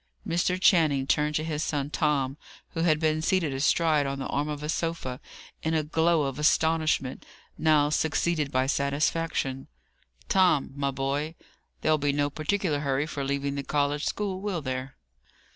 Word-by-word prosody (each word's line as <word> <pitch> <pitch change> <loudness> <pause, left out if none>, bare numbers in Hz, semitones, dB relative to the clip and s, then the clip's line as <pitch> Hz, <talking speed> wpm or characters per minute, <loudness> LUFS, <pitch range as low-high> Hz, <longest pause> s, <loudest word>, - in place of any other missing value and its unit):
Mr. 175 +2 +1
Channing 155 -8 +4
turned 150 +2 +1
to 155 - 0
his 155 -2 -2
son 145 -1 -2
Tom, 140 -4 0 0.3
who 165 - -6
had 160 -2 +3
been 155 -1 +1
seated 165 -3 +1
astride 150 +1 +2
on 140 0 -3
the 135 - -4
arm 145 +2 -1
of 150 -1 -5
a - - -3
sofa, 160 -6 -2 0.4
in 160 0 0
a 155 - +1
glow 160 +1 +2
of 135 0 -3
astonishment, 155 -3 +1 0.3
now 155 -2 +3
succeeded 155 -1 0
by 130 0 +2
satisfaction. 140 -1 -1 0.6
"Tom, 185 -9 +3
my 140 -1 -1
boy! 140 +4 -2 0.5
There'll 155 0 +2
be 145 0 +1
no 145 0 0
particular 155 0 -1
hurry 140 0 0
for 145 -3 -4
leaving 140 0 -1
the 140 - -3
college 145 +1 0
school, 195 -3 -2
will 190 -6 -3
there?" 130 0 -4
150 Hz, 160 wpm, -27 LUFS, 140-160 Hz, 0.6 s, Channing